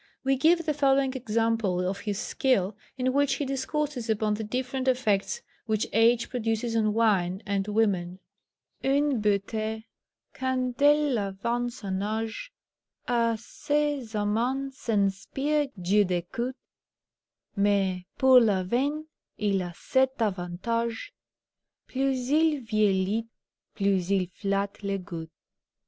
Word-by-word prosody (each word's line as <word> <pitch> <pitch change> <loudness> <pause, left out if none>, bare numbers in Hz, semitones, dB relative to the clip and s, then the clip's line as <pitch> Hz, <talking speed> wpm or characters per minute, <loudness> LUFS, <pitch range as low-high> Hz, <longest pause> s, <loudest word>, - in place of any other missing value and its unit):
We 270 0 +2
give 335 +5 +3
the 305 - +1
following 275 -2 +2
example 225 -6 0
of 195 +2 -3
his 205 -1 -3
skill, 210 -5 0 0.2
in 255 0 0
which 280 -1 +2
he 290 - -2
discourses 275 -2 -2
upon 215 -1 +1
the 215 +1 -3
different 255 +4 -3
effects 255 - +1 0.2
which 215 -1 +1
age 230 +1 +4
produces 225 -1 -2
on 215 -1 +2
wine 195 -5 +2
and 200 -1 -1
women: 195 -5 0 0.7
"Une 275 -2 +2
beauté, 215 +2 -1 0.5
quand 260 -1 -1
elle 290 -4 +4
avance 235 +5 -3
en 190 -1 -2
âge, 220 - -3 0.6
A 230 -2 +2
ses 285 -1 -2
amans 245 +6 -1
inspire 230 +9 +1
du 195 +4 +3
dégoût; 190 +8 -2 1.0
Mais, 195 -2 +2
pour 260 -1 +7
le 205 -6 +2
vin, 275 +10 0 0.3
il 200 -2 +1
a 175 -1 -4
cet 265 - +1
avantage, 225 - -2 0.7
Plus 265 -1 -1
il 310 -2 +3
vieillit, 215 -1 +1 0.5
plus 195 -3 +1
il 195 -2 +2
flatte 200 0 -2
le 200 -1 -1
goût." 170 -4 -7
225 Hz, 120 wpm, -27 LUFS, 200-260 Hz, 1.0 s, pour